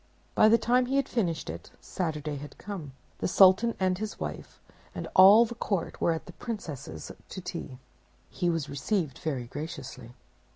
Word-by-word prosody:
By 215 - +6
the 230 - +6
time 245 +2 +2
he 270 - -1
had 275 -1 +2
finished 170 -9 -1
it - - -7
Saturday 150 -4 -3
had 145 +1 -10
come. 175 -10 -7 0.3
The - - 0
Sultan 190 +5 +5
and 185 -1 +1
his 215 0 -5
wife - - -6 0.4
and - - -4
all 200 +5 +9
the 235 - -6
court 200 -7 -3
were - - +3
at 160 - -3
the 180 - -11
'Princess's 150 - -6 0.2
to - - -6
tea. 170 -7 -6 0.5
He 175 - 0
was 165 -4 -1
received 150 +2 -2
very 140 -6 -2
graciously. 130 -3 -7
175 Hz, 170 wpm, -28 LUFS, 150-215 Hz, 0.5 s, all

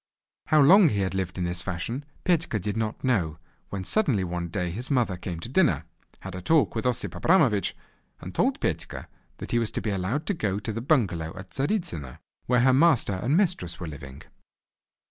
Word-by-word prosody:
How 155 - +4
long 185 +4 +7
he 100 -5 0
had 95 -1 -1
lived 95 -1 -3
in 90 - -1
this 90 0 -2
fashion, 90 +10 -4 0.2
Petka 170 -9 +1
did 100 +2 -3
not 110 -1 -3
know, 90 - +1 0.3
when 95 -2 -4
suddenly 135 - +1
one 85 -1 -3
day 90 0 -2
his 120 +9 -4
mother 125 -9 +1
came 90 -1 -6
to - - -4
dinner, 125 - +2 0.4
had 95 - -7
a 90 - -6
talk 160 - +3
with 115 +2 -1
Osip 125 -1 -1
Abramovich, 135 - +2 0.4
and - - -8
told - - +1
Petka - - -3 0.3
that - - -7
he 120 - +3
was 115 -2 0
to - - -3
be 110 - -2
allowed 100 - -2
to 205 - 0
go 100 - -1
to 105 +1 -3
the 115 - -4
bungalow 95 - 0
at 95 0 -10
Tzaritzyno, 135 - -2 0.3
where 125 0 +3
her 130 +1 +5
master 135 -7 +4
and 140 +8 +2
mistress 160 - 0
were 85 - -5
living. 70 -3 -9
105 Hz, 200 wpm, -26 LUFS, 90-135 Hz, 0.4 s, long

